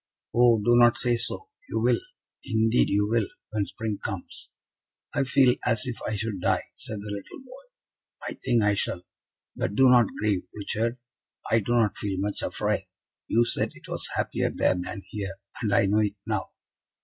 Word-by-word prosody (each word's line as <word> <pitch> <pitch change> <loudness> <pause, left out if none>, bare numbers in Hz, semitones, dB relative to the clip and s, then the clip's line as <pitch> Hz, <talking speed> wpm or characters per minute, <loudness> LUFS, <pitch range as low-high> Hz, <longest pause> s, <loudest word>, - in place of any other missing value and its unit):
"Oh, 120 -1 +6
do 120 +3 +3
not 120 0 +6
say 120 -1 +2
so! 425 - -2 0.2
You - - -1
will, - - +3 0.4
indeed 115 -1 +2
you 105 +1 +2
will, 115 -1 +1 0.2
when 105 -2 -1
spring 110 -3 -4
comes." 95 -4 -6 0.6
"I 145 - +2
feel 130 -1 +4
as 115 -3 +1
if 125 -2 -5
I 110 - -1
should 105 -3 -3
die," - - 0
said 110 -2 -5
the 105 0 -6
little 100 - -8
boy; - - -14 0.5
"I - - -4
think 120 -4 +3
I 105 0 +4
shall. 90 -3 -2 0.5
But 100 - -2
do 130 +1 +6
not 120 -3 +6
grieve, 105 -4 0
Richard. 115 +3 -1 0.5
I 115 - +5
do 115 +3 -1
not 110 -4 +2
feel 100 -3 -2
much 100 +1 -2
afraid. - - -1 0.4
You 120 +1 +3
said - - -1
it - - -14
was - - -2
happier - - 0
there - - +2
than 95 +3 -5
here, 100 -2 -4 0.3
and 110 -4 0
I 100 - +4
know 105 +2 +3
it 105 -1 +1
now." - - -2
110 Hz, 185 wpm, -26 LUFS, 100-120 Hz, 0.6 s, Oh